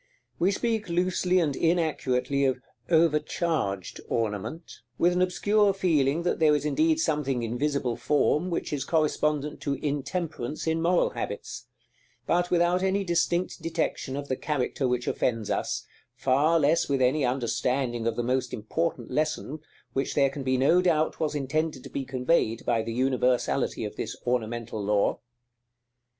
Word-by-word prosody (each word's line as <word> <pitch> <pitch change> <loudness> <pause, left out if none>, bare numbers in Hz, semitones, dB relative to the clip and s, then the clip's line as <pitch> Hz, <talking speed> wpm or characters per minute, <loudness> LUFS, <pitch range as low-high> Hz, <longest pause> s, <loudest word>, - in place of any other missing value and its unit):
We 180 - +3
speak 220 0 -1
loosely 180 +1 +1
and 150 -5 0
inaccurately 140 -5 +1
of 130 -1 +1 0.3
"overcharged" 155 - +1
ornament, 115 - -3 0.2
with 175 +1 +3
an 180 - +1
obscure 205 +2 +2
feeling 160 -4 +2
that 180 - 0
there 155 -2 +5
is 145 0 -2
indeed 315 - +2
something 140 - 0
in 115 +1 -3
visible 140 -3 0
Form 150 +3 +1
which 170 - -3
is 140 -3 -1
correspondent 150 -1 0
to 140 -1 -1
Intemperance 145 -1 -3
in 160 0 0
moral 175 +1 +2
habits; 115 +4 -6 0.6
but 175 +1 +1
without 175 +1 +2
any 190 +1 +1
distinct 175 0 0
detection 160 -4 -2
of 145 0 -5
the 130 - -1
character 135 -1 -1
which 125 0 -1
offends 115 -4 -1
us, - - -2 0.3
far 140 +7 +3
less 155 +2 +2
with 140 -1 +1
any 130 +3 +2
understanding 125 -1 0
of 115 - 0
the 120 - -1
most 125 0 -1
important 125 +2 -3
lesson 155 +1 -1 0.3
which 135 - -1
there 140 -2 +3
can 140 - -6
be 130 -1 +1
no 155 +8 +4
doubt 160 -4 +1
was 155 -1 -1
intended 145 0 -1
to - - -10
be 135 - -3
conveyed 125 -3 0
by 115 - +2
the 115 +1 -4
universality 125 0 +1
of - - -7
this - - -4
ornamental 115 -3 -2
law. 100 0 +1
145 Hz, 155 wpm, -27 LUFS, 125-170 Hz, 0.6 s, there